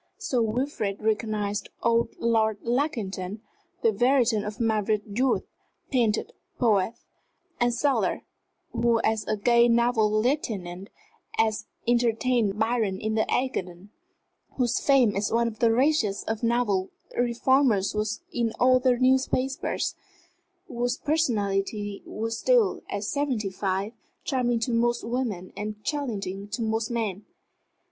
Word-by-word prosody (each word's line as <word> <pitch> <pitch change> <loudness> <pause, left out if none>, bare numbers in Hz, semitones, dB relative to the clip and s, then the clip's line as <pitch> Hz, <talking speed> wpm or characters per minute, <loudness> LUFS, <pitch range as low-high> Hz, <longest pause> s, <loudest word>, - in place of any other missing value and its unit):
Sir 360 - 0
Wilfrid 220 -3 -1
recognized 215 -2 -1
old 235 0 +2
Lord 220 -2 +2
Lackington, 220 -6 -2 0.4
the 455 - +5
veteran 245 - +2
of 210 0 -6
marvellous 215 -2 +1
youth, 245 +6 0 0.5
painter, 235 -5 +2 0.3
poet, 220 -2 +2 0.6
and 240 0 +3
sailor, 275 +3 0 0.5
who 235 -1 +2
as 220 -1 0
a 215 - 0
gay 235 +3 +4
naval 235 -2 +3
lieutenant 215 -6 -1 0.4
had 225 -1 +2 0.3
entertained 235 -2 +2
Byron 220 -4 0
in 220 +1 -2
the 220 0 +2
Ægean; 195 -7 -2 0.6
whose 245 -2 +1
fame 260 -7 +4
as 205 +1 -1
one 235 +1 +2
of 220 -2 -6
the 230 -1 +4
raciest 245 -5 +1
of 220 -1 -2
naval 230 -5 +1 0.3
reformers 240 -4 +2
was 215 +1 -2
in 230 -2 0
all 255 +1 +5
the 250 -1 +2
newspapers; 260 +1 +1 0.7
whose 245 -2 -1
personality 205 -8 -1
was 225 +1 -3
still, 485 -5 +3
at 200 0 -3
seventy 240 -5 -1
five, 195 +2 -2 0.3
charming 245 -4 +1
to 240 - -1
most 240 +1 +1
women 230 -7 -3
and 210 +1 -6
challenging 205 -9 -3
to 220 +3 -3
most 220 0 -1
men. 215 -4 -2
225 Hz, 125 wpm, -26 LUFS, 210-245 Hz, 0.7 s, the